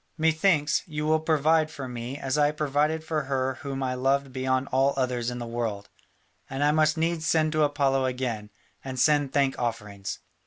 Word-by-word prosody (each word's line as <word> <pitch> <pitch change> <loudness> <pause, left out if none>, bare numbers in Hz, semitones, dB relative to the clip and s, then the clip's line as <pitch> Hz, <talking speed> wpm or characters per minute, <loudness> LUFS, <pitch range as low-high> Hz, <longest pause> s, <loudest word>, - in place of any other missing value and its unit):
Methinks, 160 -1 +2
you 150 -2 -3
will 155 +1 +3
provide 155 0 +2
for 140 -4 -7
me 125 +2 -5
as 135 -1 -2
I 145 -1 +4
provided 150 +1 0
for 155 -2 -2
her 130 -1 -1
whom 135 -1 -4
I 130 -1 -1
loved 135 +1 0
beyond 130 +1 0
all 135 +1 +2
others 125 -2 0
in 125 - -5
the 120 - -5
world, 115 -4 -3 0.6
and 135 +2 -2
I 145 - +4
must 155 0 +3
needs 165 0 0
send 155 -1 +2
to 155 0 +1
Apollo 140 -2 +2
again, 125 -5 -3 0.3
and 130 -1 -5
send 145 -1 +3
thank 140 -1 +1
offerings." 105 -5 -4
140 Hz, 185 wpm, -26 LUFS, 130-155 Hz, 0.6 s, I